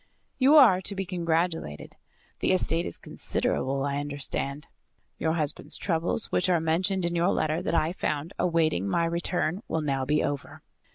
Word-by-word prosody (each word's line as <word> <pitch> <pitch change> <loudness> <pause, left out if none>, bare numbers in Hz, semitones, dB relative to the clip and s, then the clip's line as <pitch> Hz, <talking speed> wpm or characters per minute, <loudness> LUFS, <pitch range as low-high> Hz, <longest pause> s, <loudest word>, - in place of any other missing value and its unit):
"You 275 +3 +6
are 230 -11 +7
to 200 +2 -1
be 195 0 -3
congratulated. 165 - -2 0.4
The - - +2
estate 170 -2 +1
is - - -4
considerable, 135 +1 -2
I 140 0 -1
understand. 145 0 -3 0.5
Your 160 -1 +1
husband's 155 -4 -1
troubles 170 +3 0
which 185 - +1
are 175 -2 +3
mentioned 175 +4 0
in 170 0 -1
your 170 +2 +2
letter 155 +2 0
that 180 - -1
I 160 +1 +1
found 155 -1 -3
awaiting 160 - +1
my 170 - +1
return 170 +2 -1
will 160 - -1
now 135 -3 -1
be 150 +2 +1
over. 145 -1 -4
165 Hz, 165 wpm, -27 LUFS, 150-180 Hz, 0.5 s, are